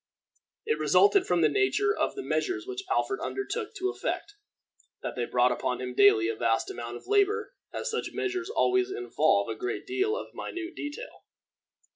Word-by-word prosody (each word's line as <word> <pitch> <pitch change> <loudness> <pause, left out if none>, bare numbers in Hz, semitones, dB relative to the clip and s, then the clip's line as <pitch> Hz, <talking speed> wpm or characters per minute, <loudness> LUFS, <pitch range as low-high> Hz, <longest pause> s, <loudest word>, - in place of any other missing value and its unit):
It 450 0 0
resulted 395 -2 +4
from - - +2
the - - +6
nature 410 +1 +2
of - - -1
the 400 - -5
measures 370 -2 -1
which 390 0 -6
Alfred 400 +1 0
undertook 425 +2 -4
to 380 -1 -1
effect, 410 - -4 0.7
that - - -4
they 120 - -1
brought 125 +1 +3
upon 125 0 -1
him 125 0 -4
daily 125 - +5
a 115 - -1
vast 115 +1 0
amount 120 0 -6
of - - -15
labor 415 +3 +2 0.2
as 475 - -3
such 450 - -2
measures 370 -1 -2
always 380 -4 +2
involve 385 -1 +1
a - - -2
great 375 -1 -4
deal 390 +4 0
of - - -7
minute 350 -1 -5
detail. 295 +13 -7
380 Hz, 175 wpm, -28 LUFS, 290-410 Hz, 0.7 s, the